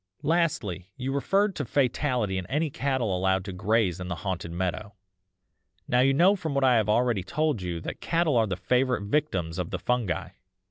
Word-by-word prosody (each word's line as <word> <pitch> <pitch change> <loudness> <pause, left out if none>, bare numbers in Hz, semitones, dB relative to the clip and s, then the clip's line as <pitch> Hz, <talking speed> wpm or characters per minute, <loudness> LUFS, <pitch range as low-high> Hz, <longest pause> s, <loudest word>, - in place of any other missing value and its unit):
"'Lastly, 130 - 0
you 130 +1 -3
referred 195 +8 +1
to 145 - -2
fatality 125 -6 0
in 90 - -7
any 150 +2 -1
cattle 130 -9 -1
allowed 95 0 +1
to 95 - -5
graze 95 -1 +1
in 90 - -5
the 90 - -3
haunted 90 -3 -3
meadow. 95 +4 -3 0.9
Now 125 - +2
you 135 +2 +5
know 175 +9 +5
from 160 -7 -4
what 140 - +2
I 125 -2 +5
have 105 -2 +1
already 120 -2 +2
told 150 - -1
you 90 -2 -3
that - - -6
cattle 165 -4 +1
are 115 -2 +3
the 95 - -2
favourite 125 +4 +1
victims 95 - -1
of 90 - -2
the - - -3
fungi. 120 -8 -1
115 Hz, 190 wpm, -27 LUFS, 95-140 Hz, 0.9 s, you